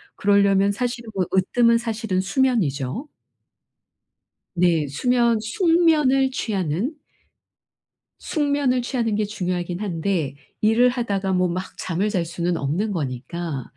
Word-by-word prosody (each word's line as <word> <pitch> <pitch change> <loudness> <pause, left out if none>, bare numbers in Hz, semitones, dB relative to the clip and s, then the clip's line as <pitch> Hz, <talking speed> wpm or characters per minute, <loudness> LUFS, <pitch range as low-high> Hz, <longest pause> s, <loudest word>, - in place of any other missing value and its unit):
그러려면 200 -1 +3
사실은 235 +1 -3
뭐 190 -2 0
으뜸은 230 +5 +3
사실은 220 -5 -2
수면이죠. 195 - 0 1.5
네. 170 -4 +2
수면 235 - +2
숙면을 300 - +3
취하는 205 - -2 1.2
숙면을 285 -5 0
취하는 235 -4 -1
게 210 0 0
중요하긴 180 -3 -3
한데 170 -6 -2 0.3
일을 225 +4 +4
하다가 200 -6 -1
뭐 180 0 +2
막 185 +2 -5
잠을 185 +4 -1
잘 180 -4 -1
수는 170 +1 -2
없는 170 +11 -1
거니까 145 -1 -4
200 Hz, 250 characters per minute, -22 LUFS, 175-245 Hz, 1.5 s, 일을